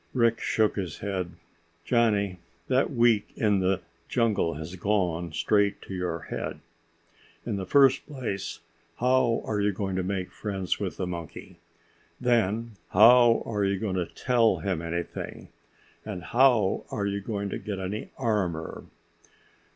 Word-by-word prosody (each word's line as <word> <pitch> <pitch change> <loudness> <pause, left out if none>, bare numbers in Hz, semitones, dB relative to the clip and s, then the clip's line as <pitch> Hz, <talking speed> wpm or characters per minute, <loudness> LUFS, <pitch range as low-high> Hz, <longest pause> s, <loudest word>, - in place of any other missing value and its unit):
Rick 115 -2 +3
shook 110 -1 +1
his 90 -6 -3
head. 95 -4 -3 0.5
"Johnny, 105 -6 +2 0.3
that 130 +1 +3
week 115 -5 +3
in 105 -3 +2
the 95 0 +1 0.3
jungle 110 -9 +1
has 80 +4 -7
gone 90 -4 0
straight 100 +5 +2
to - - -8
your 90 -3 -2
head. - - -4 0.9
In 100 - -2
the 95 -2 -4
first 135 +1 +4
place, 125 -9 -4 0.4
how 125 -1 +2
are 105 -2 -1
you 100 0 +2
going 95 -1 -3
to - - +1
make 95 0 -3
friends 95 -3 -3
with - - -3
the - - -2
monkey? 85 +1 -7 0.6
Then 115 -2 +1 0.2
how 115 +3 +7
are 105 -3 -1
you 100 0 +1
going 100 -1 -2
to 90 -2 -1
tell 120 -3 +2
him 95 -5 -2
anything? 85 +1 -5 0.5
And 95 -5 -6
how 120 -5 +3
are 100 - -2
you 100 0 -2
going 100 0 -3
to - - -4
get 105 -2 -5
any 95 +3 -4
armor?" 95 -10 -2
100 Hz, 145 wpm, -27 LUFS, 95-115 Hz, 0.9 s, how